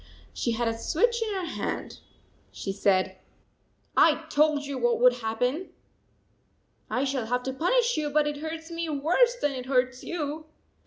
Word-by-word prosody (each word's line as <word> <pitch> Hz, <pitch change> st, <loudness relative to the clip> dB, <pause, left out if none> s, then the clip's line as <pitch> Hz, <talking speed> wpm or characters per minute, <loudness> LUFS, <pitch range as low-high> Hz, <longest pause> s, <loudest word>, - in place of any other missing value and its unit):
She 235 Hz, -, -1 dB
had 235 Hz, +1 st, 0 dB
a 225 Hz, -, 0 dB
switch 470 Hz, -, +1 dB
in 445 Hz, -1 st, -1 dB
her 375 Hz, -2 st, -2 dB
hand. 330 Hz, -, -4 dB, 0.5 s
She 195 Hz, -, -4 dB
said: 190 Hz, -1 st, +1 dB, 0.4 s
" -, -, -42 dB, 0.3 s
I 320 Hz, 0 st, +4 dB
told 300 Hz, -1 st, +3 dB
you 280 Hz, -2 st, -4 dB
what 240 Hz, -1 st, +2 dB
would 250 Hz, 0 st, +5 dB
happen! 250 Hz, +9 st, -1 dB, 1.2 s
I 255 Hz, -, 0 dB
shall 265 Hz, -4 st, -1 dB
have 250 Hz, +1 st, 0 dB
to 265 Hz, -, -3 dB
punish 475 Hz, -, +2 dB
you, 300 Hz, -1 st, 0 dB
but 300 Hz, +1 st, +2 dB
it 295 Hz, 0 st, -2 dB
hurts 320 Hz, +2 st, -6 dB
me 335 Hz, -1 st, -3 dB
worse 345 Hz, -, +3 dB
than 290 Hz, -, 0 dB
it 255 Hz, -2 st, -6 dB
hurts 255 Hz, -1 st, +1 dB
you." 310 Hz, -2 st, -4 dB
290 Hz, 170 wpm, -27 LUFS, 250-325 Hz, 1.2 s, would